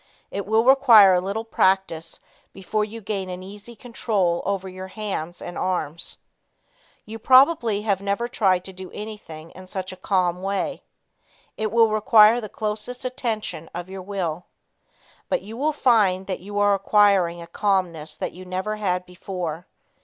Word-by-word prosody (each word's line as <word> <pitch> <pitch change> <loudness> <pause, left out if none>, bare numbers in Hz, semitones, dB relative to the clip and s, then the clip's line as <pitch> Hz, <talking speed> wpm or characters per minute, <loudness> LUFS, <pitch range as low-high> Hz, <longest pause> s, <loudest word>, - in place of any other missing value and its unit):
It 200 0 -4
will 220 +2 +3
require 245 -8 +7
a 180 - +2
little 200 +4 -3
practice 190 -6 0 0.3
before 200 +3 -2
you 220 +2 -7
gain 195 -2 -4
an 180 0 -6
easy 205 +4 -11
control 205 -6 -1
over 195 -1 -2
your 185 0 -8
hands 185 -4 -5
and 175 - -6
arms. 170 -3 -2 0.9
You 225 +1 -8
probably 255 -4 +4
have 200 -3 0
never 200 +4 -1
tried 190 -6 +1
to 190 - -8
do 185 0 -9
anything 205 -7 -9
in 185 0 -12
such 185 0 -5
a - - -8
calm 180 -1 0
way. 195 0 -2 0.7
It 215 -1 -2
will 225 0 +4
require 215 +1 +5
the 215 - -7
closest 220 +5 -4
attention 225 - -4
of 175 +2 -6
your 190 0 -6
will. 180 -4 -4 0.8
But 275 - 0
you 215 +3 -9
will 290 +6 0
find 210 -10 +2
that 190 -1 -4
you 205 +3 -7
are 205 0 +4
acquiring 195 -3 +3
a 170 - -8
calmness 170 -4 -1
you 185 - -5
never 185 +4 -3
had 180 -3 -1
before. 180 -2 -6
195 Hz, 160 wpm, -23 LUFS, 185-215 Hz, 0.9 s, require